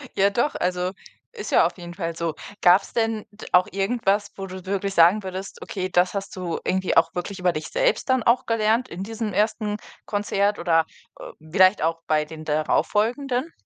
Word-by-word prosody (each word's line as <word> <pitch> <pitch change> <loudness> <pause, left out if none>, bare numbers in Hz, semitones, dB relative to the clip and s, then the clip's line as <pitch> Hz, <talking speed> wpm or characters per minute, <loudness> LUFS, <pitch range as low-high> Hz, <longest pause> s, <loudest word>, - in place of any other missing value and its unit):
ja 195 +1 +4
doch, 240 +8 0
also, 180 0 -1 0.4
ist 445 - -6
ja - - +5
auf - - -2
jeden 175 -1 -9
Fall 170 -2 -4
so. 165 -2 -2 0.3
Gab's 180 +3 +4
denn 225 -2 0
d 205 - -12
auch 180 0 +5
irgendwas, 200 0 0
wo 195 0 -5
du 185 0 -9
wirklich 195 0 -2
sagen 175 +5 +5
würdest: 190 +1 -7
„Okay, 185 -2 -4
das 180 0 +2
hast 195 -1 -5
du 180 -3 -3
irgendwie 190 -2 0
auch 165 - +4
wirklich 185 +2 -4
über 180 -1 +2
dich 155 - -4
selbst - - 0
dann 260 -3 +3
auch 235 +2 +3
gelernt 230 +2 +1
in 180 +3 -6
diesem 220 -1 -4
1. 210 +1 0 0.3
Konzert 205 0 0
oder, 165 -2 +3 0.3
äh, - - -8 0.2
vielleicht 185 +2 +5
auch 165 +1 0
bei 155 -1 +2
den 155 0 -10
darauffolgenden?“ 245 - 0
195 Hz, 190 wpm, -24 LUFS, 180-215 Hz, 0.4 s, ja